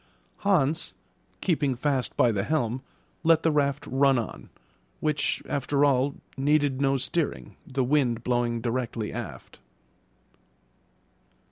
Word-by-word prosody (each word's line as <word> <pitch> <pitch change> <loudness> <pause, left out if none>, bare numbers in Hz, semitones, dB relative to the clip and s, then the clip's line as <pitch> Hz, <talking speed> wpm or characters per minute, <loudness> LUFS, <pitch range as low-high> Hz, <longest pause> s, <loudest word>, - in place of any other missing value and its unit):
Hans, 165 -5 +1 0.5
keeping 145 -7 +1
fast 135 0 -1
by 120 - +5
the 100 -3 -1
helm, 125 -3 0 0.4
let 165 0 +4
the 160 - +3
raft 145 -1 +1
run 135 0 +3
on, 115 - -5 0.5
which, 150 -1 0
after 145 +1 +1
all, 140 0 +2 0.2
needed 145 -1 +2
no 135 0 +3
steering, 145 +5 -2
the 130 -1 0
wind 125 -4 +1
blowing 120 -1 0
directly 115 -2 -2
aft. - - -8
135 Hz, 115 wpm, -27 LUFS, 125-150 Hz, 0.5 s, by